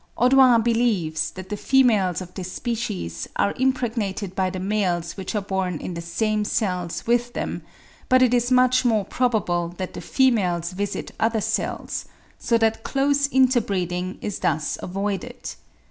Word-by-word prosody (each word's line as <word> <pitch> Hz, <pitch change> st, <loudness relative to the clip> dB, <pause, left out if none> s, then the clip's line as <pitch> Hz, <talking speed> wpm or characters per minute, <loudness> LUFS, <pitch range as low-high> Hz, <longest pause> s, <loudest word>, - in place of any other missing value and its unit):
Audouin 250 Hz, -2 st, +5 dB
believes 220 Hz, -10 st, +1 dB
that 185 Hz, 0 st, -10 dB
the 210 Hz, -, -2 dB
females 210 Hz, -8 st, +3 dB
of 180 Hz, -1 st, -9 dB
this 185 Hz, -1 st, -6 dB
species 90 Hz, -, -4 dB
are 200 Hz, -, +1 dB
impregnated 225 Hz, -7 st, -1 dB
by 190 Hz, -1 st, 0 dB
the 185 Hz, -, -5 dB
males 185 Hz, -4 st, -1 dB
which 190 Hz, +2 st, -5 dB
are 205 Hz, -, 0 dB
born 190 Hz, -3 st, -2 dB
in 180 Hz, -, -5 dB
the 170 Hz, -, -5 dB
same 210 Hz, +5 st, -1 dB
cells 180 Hz, -5 st, -2 dB
with 240 Hz, +1 st, +1 dB
them; -, -, -3 dB, 0.5 s
but 255 Hz, -1 st, +6 dB
it 250 Hz, -1 st, +3 dB
is 245 Hz, 0 st, +2 dB
much 255 Hz, 0 st, +4 dB
more 220 Hz, -5 st, +2 dB
probable 205 Hz, -9 st, 0 dB
that 185 Hz, -1 st, -5 dB
the -, -, -7 dB
females 190 Hz, -10 st, +1 dB
visit 200 Hz, +2 st, -4 dB
other 225 Hz, 0 st, +2 dB
cells, -, -, -2 dB, 0.3 s
so 235 Hz, -, +2 dB
that 225 Hz, 0 st, +1 dB
close 280 Hz, +1 st, +1 dB
inter 260 Hz, -2 st, +4 dB
breeding 185 Hz, -2 st, -3 dB
is 205 Hz, -, -3 dB
thus 155 Hz, -1 st, 0 dB
avoided. 205 Hz, +6 st, -4 dB
210 Hz, 160 wpm, -23 LUFS, 185-245 Hz, 0.5 s, but